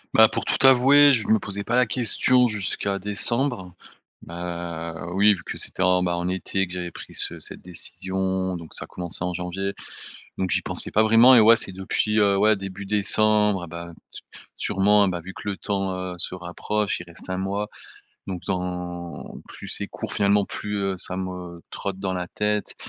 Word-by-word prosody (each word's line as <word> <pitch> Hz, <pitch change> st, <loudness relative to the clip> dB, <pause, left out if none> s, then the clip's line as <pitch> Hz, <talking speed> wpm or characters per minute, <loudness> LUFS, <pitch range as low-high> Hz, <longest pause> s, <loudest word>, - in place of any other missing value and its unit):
Bah, 110 Hz, 0 st, +8 dB
pour -, -, -3 dB
tout -, -, +1 dB
avouer, 135 Hz, +2 st, +7 dB
je 110 Hz, -4 st, 0 dB
me 110 Hz, -, +4 dB
posais 100 Hz, 0 st, -5 dB
pas 120 Hz, -, -1 dB
la 125 Hz, 0 st, +4 dB
question 125 Hz, +1 st, +2 dB
jusqu'à 100 Hz, -2 st, -2 dB
décembre. 105 Hz, 0 st, -1 dB, 0.5 s
Bah, 85 Hz, -1 st, -5 dB
oui 100 Hz, +3 st, +5 dB
vu 95 Hz, -, -8 dB
que -, -, -6 dB
c'était, 95 Hz, -, -2 dB
en 90 Hz, -1 st, +3 dB
ben, 90 Hz, -1 st, 0 dB
en 85 Hz, +1 st, -2 dB
été 95 Hz, +1 st, -1 dB
que 90 Hz, -, -13 dB
j'avais 90 Hz, -1 st, -5 dB
pris -, -, -11 dB
ce -, -, 0 dB
cette -, -, -3 dB
décision, 95 Hz, +1 st, -3 dB
donc 85 Hz, -2 st, -10 dB
ça -, -, -4 dB
a -, -, -22 dB
commencé 90 Hz, -2 st, -4 dB
en 90 Hz, -, -2 dB
janvier, 90 Hz, +3 st, -3 dB, 0.7 s
donc 95 Hz, -1 st, -1 dB
j'y -, -, +2 dB
pensais -, -, +2 dB
pas 110 Hz, -, +4 dB
vraiment. 115 Hz, +4 st, +7 dB
Et 120 Hz, -, +8 dB
ouais 115 Hz, +2 st, +7 dB
c'est 95 Hz, -, +1 dB
depuis, 105 Hz, +3 st, 0 dB
heu, 100 Hz, -1 st, +3 dB
ouais 110 Hz, +2 st, +4 dB
début 95 Hz, 0 st, -7 dB
décembre 105 Hz, -1 st, +3 dB
et -, -, -8 dB
ben, 85 Hz, +1 st, -8 dB, 0.7 s
su -, -, -2 dB
sûrement 100 Hz, +1 st, +3 dB
et -, -, +1 dB
ben 90 Hz, -1 st, -3 dB
vu 95 Hz, +3 st, -9 dB
que 100 Hz, -, -6 dB
le 100 Hz, -, -4 dB
temps, 95 Hz, -2 st, -2 dB
heu, 90 Hz, 0 st, -5 dB
se 90 Hz, -, -1 dB
rapproche, 95 Hz, +4 st, -2 dB
il 85 Hz, -, -9 dB
reste 85 Hz, -, -10 dB
1 95 Hz, -, -2 dB
mois 100 Hz, +2 st, -2 dB, 0.6 s
donc 95 Hz, -2 st, -5 dB
dans 90 Hz, -2 st, -5 dB
plus -, -, -10 dB
c'est -, -, -2 dB
court -, -, -7 dB
finalement 100 Hz, 0 st, +2 dB
plus, 105 Hz, +1 st, -5 dB
heu, 95 Hz, -1 st, -1 dB
ça 90 Hz, -, -3 dB
me 90 Hz, -2 st, -6 dB
trotte 100 Hz, -1 st, -4 dB
dans 95 Hz, -1 st, -2 dB
la 90 Hz, -1 st, -3 dB
tête. 105 Hz, +2 st, -2 dB
95 Hz, 200 wpm, -24 LUFS, 90-105 Hz, 0.7 s, Bah